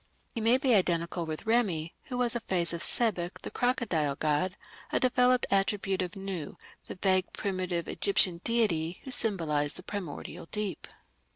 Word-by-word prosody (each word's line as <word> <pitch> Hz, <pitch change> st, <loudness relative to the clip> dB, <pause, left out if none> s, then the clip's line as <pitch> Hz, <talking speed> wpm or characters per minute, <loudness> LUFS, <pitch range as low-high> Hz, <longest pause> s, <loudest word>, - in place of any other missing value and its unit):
He 230 Hz, -, -2 dB
may 230 Hz, +3 st, +5 dB
be 265 Hz, -2 st, +2 dB
identical 170 Hz, -3 st, +1 dB
with 155 Hz, +5 st, -5 dB
Remi, 195 Hz, -9 st, +1 dB
who 250 Hz, -, -5 dB
was 245 Hz, -1 st, +1 dB
a -, -, +1 dB
phase 175 Hz, -6 st, 0 dB
of 170 Hz, -, -4 dB
Sebek, 185 Hz, -7 st, 0 dB
the -, -, -5 dB
crocodile 200 Hz, -, 0 dB
god, 155 Hz, +5 st, 0 dB, 0.3 s
a -, -, +2 dB
developed 250 Hz, 0 st, +3 dB
attribute 195 Hz, -1 st, +1 dB
of 180 Hz, +2 st, -4 dB
Nu, 190 Hz, -6 st, -5 dB, 0.3 s
the -, -, -6 dB
vague 185 Hz, 0 st, +2 dB
primitive 185 Hz, -4 st, -2 dB
Egyptian 185 Hz, -3 st, +2 dB
deity 180 Hz, -8 st, +1 dB
who 265 Hz, -, -7 dB
symbolized 165 Hz, -, +1 dB
the 180 Hz, -, -6 dB
primordial 180 Hz, -5 st, -6 dB
deep. 210 Hz, 0 st, -3 dB
190 Hz, 160 wpm, -29 LUFS, 170-225 Hz, 0.3 s, may